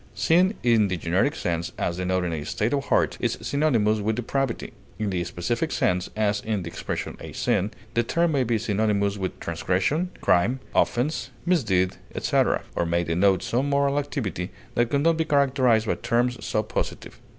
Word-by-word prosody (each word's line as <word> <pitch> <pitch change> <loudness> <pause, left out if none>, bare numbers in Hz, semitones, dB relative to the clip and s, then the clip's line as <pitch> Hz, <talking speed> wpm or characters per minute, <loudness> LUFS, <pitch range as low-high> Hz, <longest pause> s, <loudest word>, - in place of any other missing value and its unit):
Sin 185 +5 +3
in 115 -4 +4
the 95 -2 -2
generic 90 - +1
sense, 85 -2 -2
as 85 - -1
denoting 90 -1 0
a 75 -2 -3
state 105 - -1
of 140 -1 0
heart, - - +1
is - - 0
synonymous 115 -8 +1
with 110 +1 0
depravity; 125 +1 -2 0.2
in 105 -2 -2
the 90 -2 -1
specific 90 - -2
sense, 90 0 0
as 105 -1 +1
in 105 -4 -2
the - - -7
expression - - -4
a - - -8
sin, 100 - +1 0.2
the 115 - +3
term 170 +8 +1
may 140 -3 +2
be 120 -1 +1
synonymous 105 -2 0
with 95 -2 -4
transgression, 95 - 0
crime, 115 +9 +2
offense, 135 +7 +1 0.2
misdeed, 105 - +2 0.2
etc., - - +1
or - - +1
may 85 +1 +1
denote 90 +3 +2
some 130 +4 0
moral 140 0 +2
activity 115 - -3 0.2
that 120 -1 +1
could 140 +1 +1
not 165 +1 +3
be 160 - +2
characterized 130 -7 +3
by - - +1
terms 125 0 0
so 110 - 0
positive. 110 - -4
110 Hz, 175 wpm, -25 LUFS, 95-140 Hz, 0.2 s, in